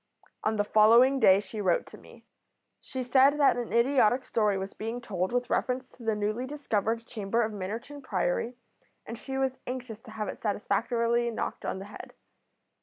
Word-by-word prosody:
On 220 - +1
the 205 - +1
following 230 +6 +5
day 190 -5 +6
she 210 +1 -6
wrote 180 -4 +1
to - - -13
me. - - -17 0.5
She 260 -1 -5
said 270 +3 +4
that 285 - +5
an 240 -1 -4
idiotic 250 0 +3
story 210 -5 +1
was 190 +1 -5
being 225 +3 -5
told 190 -6 -3
with 245 0 -1
reference 255 0 -1
to - - -19
the 225 -2 0
newly 215 +4 -2
discovered 230 -5 -2
chamber 230 +1 -1
of 220 - -2
Minnerton 225 +9 -6
Priory, 220 +1 -1 0.5
and 230 - -6
she 265 +3 -6
was 265 -1 -1
anxious 250 -3 -6
to 255 - -14
have 215 -1 -4
it - - -6
satisfactorily 235 +3 0
knocked 225 - -4
on - - -2
the 190 - -7
head. 205 - -11
230 Hz, 180 wpm, -28 LUFS, 210-255 Hz, 0.5 s, day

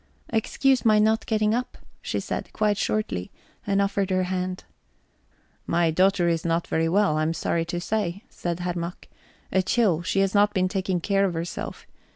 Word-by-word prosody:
"Excuse 245 +2 +1
my 215 -2 +5
not 220 +1 +2
getting 215 -1 +2
up," 250 +2 -2 0.2
she - - -2
said, - - -4
quite 210 -1 +2
shortly, 150 - -1 0.4
and 200 -1 +2
offered 200 -1 +1
her 185 0 +1
hand. 185 0 -3 1.0
"My 170 -1 +2
daughter 185 +1 +3
is 165 -1 +1
not 170 0 0
very 165 0 0
well, 195 -3 +3
I'm 155 +1 0
sorry 165 +1 0
to 175 +1 -3
say," 200 0 -2
said 175 0 -4
Herr 175 0 -1
Mack. 170 +1 -6 0.4
"A 190 - +3
chill 185 -3 +2
she 195 +2 0
has 195 -1 +1
not 205 +1 +3
been 185 -1 +2
taking 185 -2 -1
care 200 +2 +2
of 180 -3 -1
herself... 165 +1 -5
185 Hz, 180 wpm, -25 LUFS, 170-210 Hz, 1.0 s, my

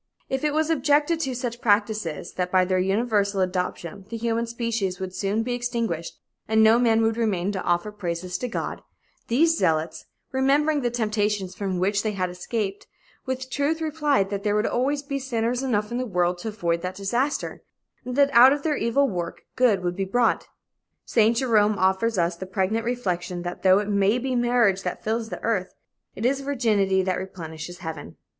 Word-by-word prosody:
If 265 +1 -2
it 300 -1 +1
was 315 +1 +1
objected 295 +2 +2
to 270 -5 -2
such 240 -1 -4
practices 205 -7 0
that 180 -1 -2
by 185 -1 +4
their 185 0 +1
universal 200 +1 +1
adoption 185 +1 -3
the 230 - -4
human 230 0 -1
species 230 -5 -2
would 190 -1 -5
soon 205 +3 -1
be 245 +1 -2
extinguished 235 -9 -3 0.3
and 220 0 +4
no 220 +2 +6
man 225 -2 +3
would 225 0 +1
remain 200 -5 0
to 190 -2 -3
offer 175 +4 0
praises 180 -2 -4
to 250 - -2
God, 235 - -4 0.5
these 325 +8 +3
zealots, 160 - 0 0.2
remembering 285 +3 +2
the 245 - +1
temptations 210 -4 -1
from 190 -1 -3
which 200 +3 +1
they 215 -1 -2
had 185 -2 -2
escaped, 195 +2 -4 0.4
with 260 0 -4
truth 290 +4 0
replied 300 -11 +1
that 200 -1 -2
there 205 0 0
would 210 +1 +1
always 280 +4 0
be 280 -1 -3
sinners 245 -2 -1
enough 215 -5 -1
in 240 - -1
the 255 - -2
world 180 -3 0
to 200 - -6
avoid 170 -6 -1
that 180 +1 -4
disaster, 240 +9 -2 0.4
and 250 0 -5
that 280 0 +3
out 245 +3 +9
of 285 0 -1
their 305 -2 0
evil 275 +5 +2
work, 175 -6 -4
good 225 -8 +3
would 175 0 -1
be 195 - -1
brought. 235 +5 +1 0.6
Saint 225 0 +3
Jerome 215 -5 +3
offers 190 +4 +1
us 170 0 +1
the 190 +2 -7
pregnant 195 +4 -1
reflection 180 -7 -2
that 175 0 -5
though 190 0 +6
it 205 0 -1
may 200 +2 +2
be 255 +1 -2
marriage 240 -5 +3
that - - -4
fills 225 +1 -1
the - - -7
earth, 200 -5 -1 0.4
it 215 - -4
is 270 +2 +2
virginity 215 -9 +1
that 185 -1 -1
replenishes 175 -2 -7
heaven." 160 -1 -6
215 Hz, 190 wpm, -24 LUFS, 185-245 Hz, 0.6 s, out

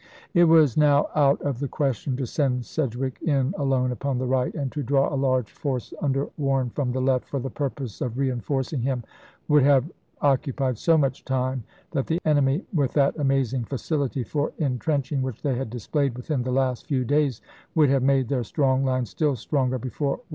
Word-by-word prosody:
^ - - -27 0.3
It 175 -2 +6
was 160 -6 +5
now 145 -1 +4
out 140 -2 +3
of 140 -4 -2
the 140 - -2
question 135 -2 -1
to 135 - -2
send 125 -1 0
Sedgwick 130 -1 -3
in 140 -1 +1
alone 135 -4 +1
upon 135 +1 -2
the 130 - -1
right; 130 0 +1
and 140 -5 -2
to 150 - -3
draw 135 +2 +1
a - - 0
large 130 -4 +1
force, 130 -4 -4
under 140 -1 0
Warren, 135 -3 +1
from 130 -2 -1
the 130 - -2
left, 130 -1 +1
for 140 - -3
the 130 0 -4
purpose 135 -5 -4
of 125 -1 -2
re 135 -1 +1
enforcing 130 +2 -2
him, 125 -1 -1 0.4
would 150 -1 +5
have 140 +3 +4 0.3
occupied 135 -3 +1
so 165 -1 +4
much 135 -3 0
time 130 -1 -1 0.3
that 135 - -1
the 165 +1 0
enemy, 145 +1 +2
with 145 -6 +1
that 140 -2 +3
amazing 135 -3 +1
facility 140 0 -2
for 145 +6 -2
in 135 -6 -1
trenching 140 0 -1
which 130 -3 -4
they 140 - +1
had 125 -1 -3
displayed 125 +3 -1
within 130 +2 -2
the 125 +1 -2
last 130 -1 0
few 130 -4 0
days, 145 -2 +1 0.4
would 150 -4 +5
have 135 -1 +3
made 135 -1 +2
their 130 -2 0
strong 135 +2 +1
line 130 -2 +1
still 145 +6 0
stronger 130 +2 0
before 130 +4 -3
Warren 135 - 0
could - - -22
arrive. - - -38
135 Hz, 210 wpm, -25 LUFS, 130-145 Hz, 0.4 s, It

